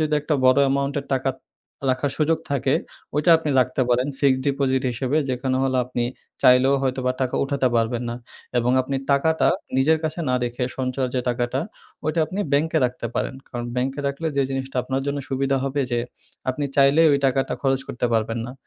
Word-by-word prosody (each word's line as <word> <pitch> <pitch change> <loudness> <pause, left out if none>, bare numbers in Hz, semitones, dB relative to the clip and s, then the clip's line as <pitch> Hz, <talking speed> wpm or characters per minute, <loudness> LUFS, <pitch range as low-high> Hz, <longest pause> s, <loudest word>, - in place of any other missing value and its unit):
যদি 155 -1 +1
একটা 150 +1 -1
বড় 130 +1 +6
অ্যামাউন্টের 140 +1 0
টাকা 135 0 0 0.6
রাখার 130 +2 0
সুযোগ 160 +1 +2
থাকে, 135 0 +1 0.4
ওইটা 150 +3 +3
আপনি 160 -2 -4
রাখতে 130 +1 +1
পারেন 125 +2 +2
ফিক্সড 135 -2 +3
ডিপোজিট 135 -2 +1
হিসেবে। 130 +4 -1
যেখানে 130 0 -1
হল 130 -1 0
আপনি 120 -1 -2 0.4
চাইলেও 130 +2 +6
হয়তোবা 130 -1 0
টাকা 130 -1 0
উঠাতে 135 -2 +1
পারবেন 115 +1 0
না। 120 - -3 0.4
এবং 120 +1 +1
আপনি 135 +1 -3
টাকাটা 160 +3 +3 0.3
নিজের 155 +4 +4
কাছে 160 +2 -2
না 125 - +2
রেখে 120 +1 -2
সঞ্চয়ের 130 0 -1
যে 130 - +1
টাকাটা, 120 +2 -1 0.4
ওইটা 155 +2 -1
আপনি 195 +5 -4
ব্যাংকে 160 +3 +2
রাখতে 125 -1 -2
পারেন। - - -2
কারণ 120 -1 -5
ব্যাংকে 135 +3 -1
রাখলে 140 +4 -2
যে 140 - +4
জিনিসটা 135 0 -4
আপনার 135 +1 -2
জন্য 140 0 -1
সুবিধা 135 0 0
হবে 135 +1 -1
যে 120 - +1 0.5
আপনি 130 +3 -3
চাইলেই 145 +4 +5
ওই 140 - +3
টাকাটা 135 0 0
খরচ 135 -1 +2
করতে 125 - -1
পারবেন 115 +1 0
না। 125 - -7
135 Hz, 185 wpm, -23 LUFS, 125-140 Hz, 0.6 s, বড়